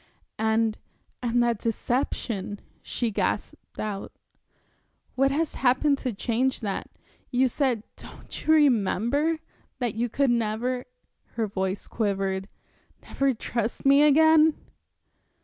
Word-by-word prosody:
"And, 220 0 +1 0.4
and 240 0 +2
that 235 -3 +1
deception," 225 -3 -2 0.2
she 235 -2 -2
gasped - - -3
out. 205 -2 -4 1.0
"What 270 +1 +3
has 305 +3 -1
happened 270 +3 +3
to 255 - -2
change 240 +5 -1
that? 200 -3 -3 0.4
You 255 +1 +3
said 250 -4 0
don't - - -10
you - - +5
remember? 285 - +3 0.4
that 240 -5 -1
you 235 +2 -1
could 275 +2 +2
never" 235 +2 -1 0.5
her 225 - 0
voice 190 -1 -3
quivered 195 -2 -2 0.5
"never 275 0 0
trust 235 0 -3
me 275 +1 +6
again." 315 +1 +6
240 Hz, 115 wpm, -26 LUFS, 215-275 Hz, 1.0 s, me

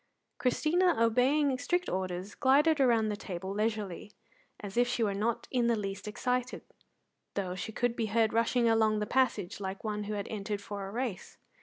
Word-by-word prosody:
Christina, 335 +7 +2
obeying 255 +4 +3
strict 355 +5 0
orders, 185 +1 -3
glided 295 +3 +4
round 230 -5 +3
the - - -2
table 190 -1 -6
leisurely, 210 -2 -2 0.5
as 200 -2 -7
if 245 +1 +3
she 240 -1 0
were 205 -2 +1
not 220 +4 -1
in 245 -2 +2
the 235 - +3
least 200 -1 -5
excited, 250 +3 -2 0.7
though 185 -3 -2
she 185 +4 -5
could 245 +2 0
be 225 -2 -1
heard 220 +1 +2
rushing 235 +1 +2
along 220 -1 +3
the 210 - -1
passage 215 -7 0
like 190 -1 -5
one 210 -1 -3
who 210 +1 -3
had 200 -1 -4
entered 205 -1 -3
for 200 -1 -6
a - - -7
race. 230 -4 -4
220 Hz, 180 wpm, -31 LUFS, 200-250 Hz, 0.7 s, glided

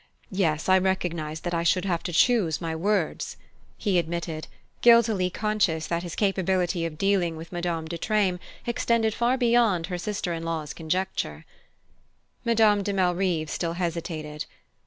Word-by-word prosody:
Yes, 165 -5 0
I 190 0 +6
recognize 170 -5 -1
that 175 - -3
I 170 - +1
should 180 +2 +2
have 175 -3 0
to 180 - -4
choose 180 - +3
my 165 -1 -3
words," 190 0 -1 0.4
he 195 -4 +2
admitted, 165 -1 -4 0.3
guiltily 225 -6 +5
conscious 185 -6 0
that 170 0 -1
his 175 -2 -6
capability 185 -3 +1
of 155 -2 -9
dealing 185 -3 +1
with 165 +1 -9
Madame 170 -2 -2
de 170 +1 -5
Treymes 200 -5 +1 0.3
extended 230 -2 +1
far 240 +3 +1
beyond 235 -8 +3
her 175 - -2
sister 195 -2 -2
in 165 - -4
law's 165 -2 -3
conjecture. 160 - -2 1.0
Madame 220 -3 +4
de 200 +1 -2
Malrive 180 -4 +1
still 165 -1 -2
hesitated. 165 -3 -4
180 Hz, 150 wpm, -26 LUFS, 165-200 Hz, 1.0 s, I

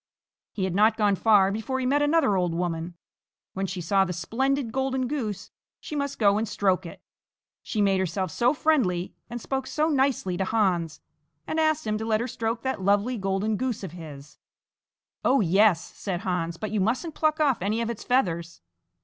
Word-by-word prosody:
He 195 - -3
had 185 -2 -1
not 215 +3 +4
gone 205 -3 +3
far 200 -1 +4
before 225 +6 -3
he 255 - -2
met 285 +3 +2
another 290 -8 +3
old 180 -3 0
woman. 170 0 -3 0.6
When 195 0 -2
she 185 -1 -5
saw 195 +3 +3
the 180 -1 -3
splendid 255 +7 -1
golden 265 0 -1
goose, 235 -8 -4 0.3
she 300 - -7
must 280 -1 -2
go 205 -1 +3
and 225 - -2
stroke 190 -3 0
it. - - -12 0.6
She 210 -2 -1
made 195 -1 +2
herself 185 0 -2
so 240 +9 +2
friendly 245 - +1 0.2
and 240 +1 -5
spoke 265 +2 -3
so 305 +4 0
nicely 265 - +1
to 190 - 0
Hans, 180 -7 0 0.4
and 320 - -2
asked 310 -1 +1
him 215 0 -1
to 220 - -3
let 220 -1 +1
her 235 - -2
stroke 230 -2 -3
that 260 -6 -2
lovely 205 +6 +2
golden 195 +1 -1
goose 250 -3 -2
of 185 - -5
his. 150 -4 -11 0.8
"Oh, 275 - +4
yes!" 190 -1 +3
said 185 -3 -4
Hans, 170 -2 -2
"but 215 +1 -5
you 215 - 0
mustn't 255 - -1
pluck 310 0 +1
off 280 -8 +2
any 210 +4 0
of 235 0 -1
its 230 - -7
feathers!" 170 -10 0
210 Hz, 190 wpm, -26 LUFS, 185-255 Hz, 0.8 s, not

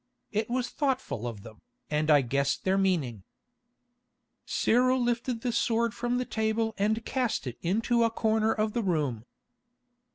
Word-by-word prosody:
It 215 +1 -1
was 250 0 -1
thoughtful 265 - -1
of 110 -4 -7
them, 110 -2 -13 0.3
and 150 +1 0
I 145 -2 +7
guessed 140 +2 0
their 190 0 +2
meaning." 165 - 0 1.3
Cyril 255 +2 +3
lifted 240 0 -1
the 245 - -1
sword 230 0 +1
from 240 +1 -1
the 250 - -1
table 220 0 0
and 220 +3 +1
cast 255 - -1
it 125 -2 -6
into 230 +6 +1
a 230 - +3
corner 220 -1 +1
of 215 -1 0
the 235 - 0
room. 145 - -1
220 Hz, 155 wpm, -28 LUFS, 150-235 Hz, 1.3 s, I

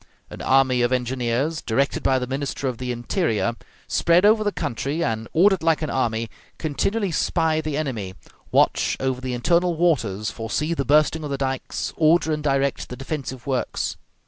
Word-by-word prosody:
An - - -8
army 130 -2 +3
of 120 +1 +2
engineers, 125 +4 -1
directed 135 +5 0
by 130 - +2
the 125 - -2
Minister 135 +1 -3
of 125 -3 -3
the 125 -1 -3
Interior, 120 - 0 0.3
spread 170 +3 +3
over 215 +1 +5
the 205 - 0
country, 145 - -2
and, 110 -1 -2
ordered 190 +2 +4
like 160 -1 +2
an 155 - -2
army, 115 -3 0 0.3
continually 195 +6 -1
spy 160 0 +1
the 155 -2 -3
enemy, 115 -11 -3 0.4
watch - - +2
over 130 -1 -1
the 130 -1 -3
internal 170 +7 +2
waters, 115 - +1
foresee 120 +9 -2
the 140 -4 -2
bursting 155 +3 +3
of 150 - -4
the 140 - -2
dikes, 135 -1 -3
order 160 0 +3
and 150 - -2
direct 140 -1 0
the 125 - -6
defensive 135 -3 -5
works. 130 -2 -2
135 Hz, 170 wpm, -23 LUFS, 125-160 Hz, 0.4 s, over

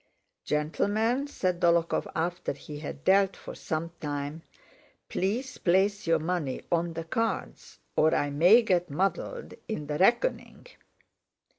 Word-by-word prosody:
"Gentlemen," 210 - 0
said 185 -10 -1
Dólokhov 170 -1 +2
after 170 0 -1
he 145 +1 -9
had 145 -2 -7
dealt 195 0 +4
for - - -9
some 160 +1 -4
time. 145 +1 -4 0.7
"Please 235 +8 -2
place 195 +2 +2
your 165 0 +4
money 160 -4 -2
on 170 0 +1
the 165 0 -4
cards 225 +7 -3 0.2
or 155 +1 +4
I 145 0 0
may 180 +11 +6
get 180 -4 +1
muddled 195 - -2
in 215 -10 -4
the 150 0 -3
reckoning." 240 - +1
175 Hz, 130 wpm, -28 LUFS, 155-200 Hz, 0.7 s, may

